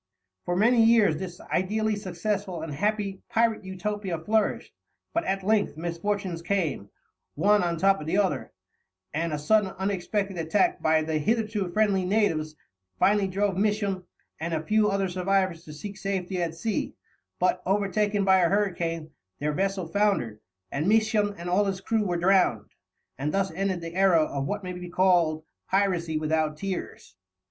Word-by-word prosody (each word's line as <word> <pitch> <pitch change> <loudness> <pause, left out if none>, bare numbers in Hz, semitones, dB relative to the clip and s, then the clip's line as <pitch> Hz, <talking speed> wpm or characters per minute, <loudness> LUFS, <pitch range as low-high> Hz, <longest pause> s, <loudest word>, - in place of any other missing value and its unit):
For 175 - -1
many 225 +4 +4
years 225 -8 +5
this 180 0 -7
ideally 215 +4 0
successful 195 -2 -3
and 160 -2 -5
happy 205 +3 -1
pirate 225 -2 +1
Utopia 190 -1 -3
flourished; 215 +7 0 0.4
but 335 +1 +1
at 195 0 -1
length 205 -5 +1
misfortunes 175 +1 -3
came, 170 - -1 0.5
one 205 +6 +4
on 170 -1 -1
top 195 +2 +3
of 150 - -7
the 165 - +1
other, 185 -9 0 0.6
and 165 +2 -1
a 150 - -1
sudden 205 +7 +2
and - - -13
unexpected 195 0 -2
attack 210 - +1
by 155 0 +3
the 155 0 -1
hitherto 215 +1 0
friendly 200 -1 +2
natives 180 -6 0 0.4
finally 200 - +3
drove 195 0 0
Misson 200 -2 0 0.4
and 165 +1 -2
a 155 - -2
few 215 +4 +3
other 195 -1 0
survivors 185 -1 0
to 150 - -10
seek 195 +7 -8
safety 190 -2 -2
at 165 -1 -2
sea, 210 +6 -2 0.4
but, 180 0 +1
overtaken 205 +1 +1
by 190 -1 +5
a 170 -2 +3
hurricane, 170 -5 -1 0.3
their 150 +1 -1
vessel 195 +1 -1
foundered, 165 - 0 0.3
and 150 +5 -1
Misson 215 -2 +2
and 170 +1 -7
all 185 +4 +2
his 195 -1 -2
crew 220 +2 0
were 175 -1 0
drowned; 185 +1 +2 0.5
and 145 +2 -1
thus 195 +1 0
ended 190 +1 -2
the 165 0 -6
era 185 -4 +4
of 140 -2 -3
what 205 +3 -3
may 180 0 -5
be 180 0 -7
called 175 -4 +2 0.3
"piracy 180 -5 +1
without 155 0 0
tears." 190 - -6
190 Hz, 165 wpm, -26 LUFS, 170-205 Hz, 0.6 s, years